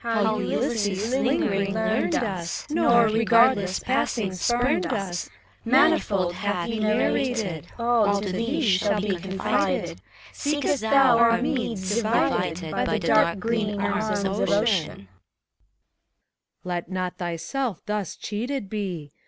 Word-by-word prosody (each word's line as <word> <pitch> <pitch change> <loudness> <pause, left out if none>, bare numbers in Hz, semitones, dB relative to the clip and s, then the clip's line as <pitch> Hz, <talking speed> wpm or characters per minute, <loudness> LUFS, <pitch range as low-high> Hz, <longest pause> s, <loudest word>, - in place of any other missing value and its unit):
How 220 -2 0
Ulysses, 205 0 -1
lingering, 200 -7 0
learned 220 +1 0
us, 190 -7 -3
Nor, 235 -6 +4
regardless 225 -3 +3
passing, 235 -6 -1
spumed 240 +9 +1
us, 195 -8 -3 0.3
Manifold 230 - +2
hath 185 -1 -2
he 225 -1 -3
narrated: 215 - 0
All 230 -4 +2
to 200 -2 -4
thee 235 - -1
shall 205 -1 +2
be 200 -1 -1
confided, 190 +2 -2 0.3
Seekest 290 -1 -1
thou 245 +1 +4
our 230 0 +4
meads, 230 -6 -2
divided 180 -7 0
By - - -1
the 220 - 0
dark 170 - +3
green 210 -1 -2
arms 205 +1 -1
of 195 +2 -1
Ocean. 200 - +1
SPHINX. 100 - -18 1.6
Let 175 -1 -4
not 185 -1 -4
thyself 180 - -3
thus 210 -3 -3
cheated 225 +1 -4
be 180 -9 -4
210 Hz, 120 wpm, -24 LUFS, 190-235 Hz, 1.6 s, Nor